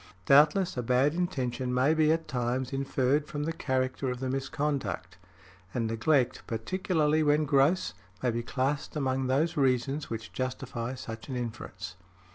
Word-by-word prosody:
Doubtless, 150 - +5
a - - +1
bad 125 +5 +3
intention 130 -8 -1
may 130 +5 +4
be 155 -1 +4
at 160 0 0
times 125 +1 -1
inferred 135 +1 +1
from 145 -1 -3
the 165 +2 -1
character 130 -3 -1
of 125 -1 -3
the 130 0 -2
misconduct; 140 +1 -2 0.6
and 120 -2 0
neglect, 120 +4 +1
particularly 155 - +1
when 150 0 +3
gross, 145 +5 +3 0.3
may 125 - +3
be 115 +1 -2
classed 135 +5 -2
among 130 -2 0
those 155 +6 +1
reasons 135 +2 +1
which 115 -1 -6
justify 125 -1 -3
such 115 -1 -8
an 130 - -3
inference. 105 -5 -6
135 Hz, 150 wpm, -29 LUFS, 125-150 Hz, 0.6 s, Doubtless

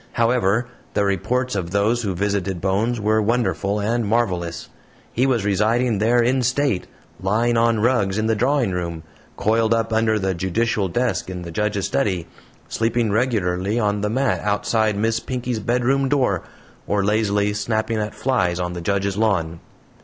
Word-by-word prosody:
However, 120 -1 +2 0.3
the 100 -1 +2
reports 125 +7 0
of 90 -4 -2
those 105 +5 +1
who 100 -5 -2
visited 100 -1 -1
Bones 105 +6 0
were 110 +1 +2
wonderful 105 -2 0
and 115 +3 0
marvelous. 95 -6 -1 0.5
He 125 +3 +2
was 120 -6 +1
residing 110 +3 +1
there 120 +3 +3
in 130 +2 +2
state, 130 -4 0 0.3
lying 115 +5 +1
on 115 -1 +2
rugs 105 -5 +2
in 110 - 0
the 110 - +2
drawing 125 0 +1
room, 85 -3 -4 0.3
coiled 110 +1 +2
up 115 0 -1
under 110 -1 +2
the 95 -2 -1
judicial 95 +3 0
desk 95 -1 -1
in 90 -1 -6
the 85 - -7
judge's 105 +2 -1
study, 90 -5 0 0.4
sleeping 115 -1 0
regularly 105 -3 0
on 105 -2 0
the 105 - 0
mat 130 +2 +1
outside 105 +1 0
Miss 110 +2 +1
Pinkey's 125 -1 -3
bedroom 125 +5 +1
door, 125 -10 +1 0.5
or 100 -1 +1
lazily 105 -1 +1
snapping 110 +1 -1
at 105 0 -3
flies 90 -10 0
on 90 0 -2
the 85 - -5
judge's 100 +2 -1
lawn. 85 -7 0
110 Hz, 160 wpm, -21 LUFS, 100-120 Hz, 0.5 s, there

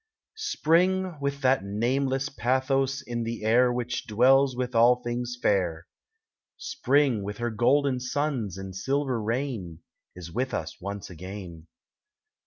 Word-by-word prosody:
Spring, 185 - +2
with 140 0 -2
that 130 -5 +3
nameless 130 +7 0
pathos 130 +1 0
in 120 -1 -4
the 115 -1 -4
air 120 +3 +4
Which 120 0 -3
dwells 130 +4 +4
with 125 0 -3
all 120 +2 +4
things 120 +1 -3
fair, 90 -6 0 0.7
Spring, 135 -5 +1
with 100 +1 -5
her 120 0 -2
golden 130 +4 +2
suns 125 - -2
and 95 -1 -7
silver 130 +4 -1
rain, 110 - -3 0.3
Is 85 -2 -9
with 130 +5 -2
us 80 +3 -5
once 100 0 -6
again. 90 -2 -9
125 Hz, 130 wpm, -27 LUFS, 105-135 Hz, 0.7 s, air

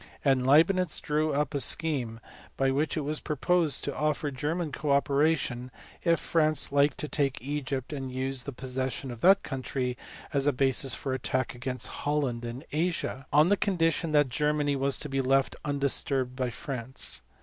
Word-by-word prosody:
and 130 -2 +3
Leibnitz 165 +4 +4
drew 155 +1 0
up 145 -1 0
a 140 - 0
scheme 130 -7 0 0.4
by 135 0 +2
which 150 +4 0
it - - 0
was 150 +1 -2
proposed 160 0 +1
to 140 - -3
offer 150 -1 -1
German 150 +4 -2
co 150 - -4
operation, 140 -3 +1 0.3
if 170 -1 +3
France 155 -3 +1
liked 140 +1 +3
to 150 - -4
take 140 -3 0
Egypt 140 -1 -3
and 135 -2 -5
use 130 0 -1
the 140 - -6
possession 130 +1 -3
of 120 - -9
that 195 +2 +6
country 130 -1 -3 0.4
as 140 0 +1
a 145 - +4
basis 135 0 +2
for 135 - -3
attack 130 -1 -1
against 125 +1 -4 0.2
Holland 140 -5 -1
in 120 +4 -6
Asia, 155 -4 -2
on 150 +4 +5
the 205 - +5
condition 165 -5 +1
that 145 -3 +4
Germany 150 +2 +1
was 135 0 0
to - - -5
be 135 -1 -1
left 135 +1 +2
undisturbed 140 -2 0
by 125 -1 -1
France. 130 +1 -4
140 Hz, 170 wpm, -28 LUFS, 130-150 Hz, 0.4 s, that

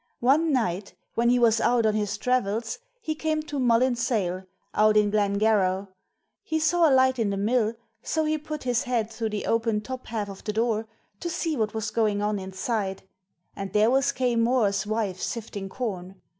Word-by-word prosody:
One 300 +6 +3
night, 200 -7 -1 0.2
when 235 +1 +2
he 250 - +4
was 230 -2 +4
out 235 -2 +3
on 215 - +3
his 210 -1 -1
travels 240 - -1 0.2
he 315 - -2
came 310 0 -1
to 295 -2 -4
Mullin 245 0 +3
Sayle, 195 -7 -1 0.3
out 215 0 +4
in 210 -1 +3
Glen 205 -1 +1
Garragh. 200 -3 +2 0.5
He 315 0 -2
saw 325 +1 +4
a - - +2
light 260 -1 +4
in 220 -3 +1
the 200 - -2
mill, 220 +2 +1 0.3
so 315 +4 -1
he 310 0 0
put 305 0 -6
his 245 +2 0
head 230 -3 -1
through 225 0 -3
the 210 -1 -3
open 225 -1 +1
top 255 +3 -7
half 220 -2 -3
of 195 -1 -10
the 210 - -3
door 225 0 0 0.3
to 345 - -3
see 330 -1 -1
what 215 -3 -1
was 220 -1 -2
going 215 -2 +1
on 210 0 0
inside, 190 +1 -3 0.5
and 195 -1 -6
there 215 +2 +4
was 270 +1 +3
Quaye 250 -2 0
Mooar's 230 -4 +2
wife 210 -4 -2
sifting 205 -4 -4
corn. 190 -6 -5
225 Hz, 195 wpm, -26 LUFS, 205-255 Hz, 0.5 s, he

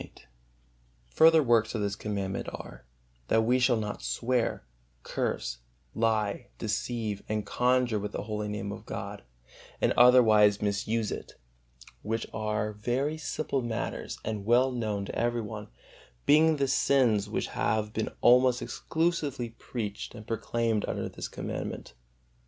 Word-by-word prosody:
XXVIII. - - -13 0.8
Further 160 - +6
works 115 -2 +3
of 110 - -1
this 100 -1 -1
Commandment 100 -3 -3
are: - - -10 0.4
that 110 - +3
we 125 +3 +3
shall 125 -1 +3
not 105 -1 -4
swear, 115 - -1 0.4
curse, - - -2 0.3
lie, 110 +1 0
deceive 110 -1 -2
and 105 -1 -1
conjure 125 -3 +2
with 105 +1 -4
the - - -4
holy 105 0 -3
Name 105 -1 -4
of - - -9
God, - - -5 0.6
and - - +2
otherwise 110 -5 +6
misuse 105 +1 -1
it; - - -6 0.7
which 115 +2 -2
are 105 -1 -1
very 130 +9 -1
simple 150 -3 -2
matters 120 -2 -4
and 110 -2 -3
well 120 +4 +4
known 110 -5 -2
to - - -6
every 120 0 0
one, 105 -1 -7 0.6
being 155 +2 +5
the 140 -2 0
sins 125 -7 +3
which - - -2
have 105 0 -1
been 110 - -1
almost 125 0 +5
exclusively 155 -8 -1
preached 115 -2 -6
and 110 -2 -10
proclaimed 115 -1 -1
under - - -2
this - - -6
Commandment. - - -5
115 Hz, 140 wpm, -29 LUFS, 105-125 Hz, 0.8 s, Further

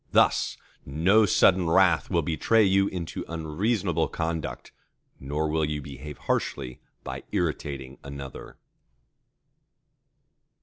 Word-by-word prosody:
Thus - - +3 0.3
no 95 +10 +3
sudden 90 -2 +4
wrath 90 -2 +4
will 85 -3 +1
betray 95 +8 +3
you 95 0 +3
into 85 -4 -5
unreasonable 85 +2 -1
conduct, 80 -1 -4 0.5
nor 75 +3 -2
will 80 +1 0
you 75 0 -1
behave 70 +1 -9
harshly 65 -3 -2 0.2
by - - -6
irritating 70 -2 -3
another. 70 -1 -9
80 Hz, 100 wpm, -26 LUFS, 75-95 Hz, 0.5 s, sudden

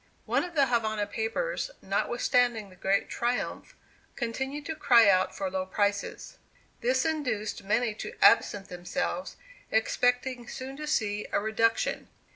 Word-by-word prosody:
One - - +1
of 350 -1 -7
the 280 -2 +5
Havana 220 -4 0
papers, 225 - -2
notwithstanding 240 -4 +1
the - - -15
great 195 +2 +1
triumph, 240 +1 -2 0.4
continued 265 +5 -3
to 320 - -3
cry 235 -7 +6
out 185 -1 +3
for 195 - -2
low 185 0 -2
prices. 200 +1 -2 0.4
This 260 +3 +1
induced 250 -10 -2
many 220 +3 +1
to - - -7
absent 200 -1 +4
themselves, 180 +10 -3 0.3
expecting 245 +2 +1
soon 265 +1 -7
to 300 0 -6
see 210 -7 0
a - - +2
reduction. 220 +2 0
230 Hz, 135 wpm, -28 LUFS, 205-260 Hz, 0.4 s, cry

